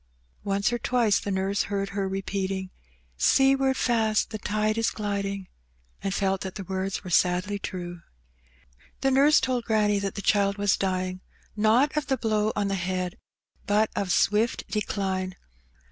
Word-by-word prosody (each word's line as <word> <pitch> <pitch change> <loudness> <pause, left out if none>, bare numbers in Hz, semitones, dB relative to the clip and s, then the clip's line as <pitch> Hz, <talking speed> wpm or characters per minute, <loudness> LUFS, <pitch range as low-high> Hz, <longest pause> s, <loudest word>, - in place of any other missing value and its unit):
Once 200 +3 0
or 240 - -1
twice 230 -3 +2
the - - -5
nurse 195 +1 0
heard 195 -1 -1
her 195 -1 -2
repeating, 190 -1 -3 0.3
'' - - -37 0.2
Seaward 270 0 +3
fast 225 -3 +1
the 215 - -4
tide 215 +1 0
is 225 0 +1
gliding," 200 -2 -3 0.5
and 195 - -2
felt 195 -1 0
that 190 -1 -5
the 200 - -5
words 190 +1 -3
were 185 - -7
sadly 180 +4 +2
true. 175 -3 -6 1.0
The 270 - +2
nurse 280 +3 +5
told 250 -2 -1
granny 210 -2 +2
that 200 -1 -3
the 200 - -5
child 200 -1 +2
was 205 -1 +2
dying, 185 -1 -2 0.3
not 225 +8 +3
of 300 -2 -1
the 265 - +1
blow 215 -2 +1
on 205 -1 0
the 195 - -1
head, 185 -1 -2 0.5
but 210 +1 +2
of 195 -3 -1
swift 210 +5 +2
decline. 190 -3 -2
200 Hz, 160 wpm, -26 LUFS, 190-215 Hz, 1.0 s, nurse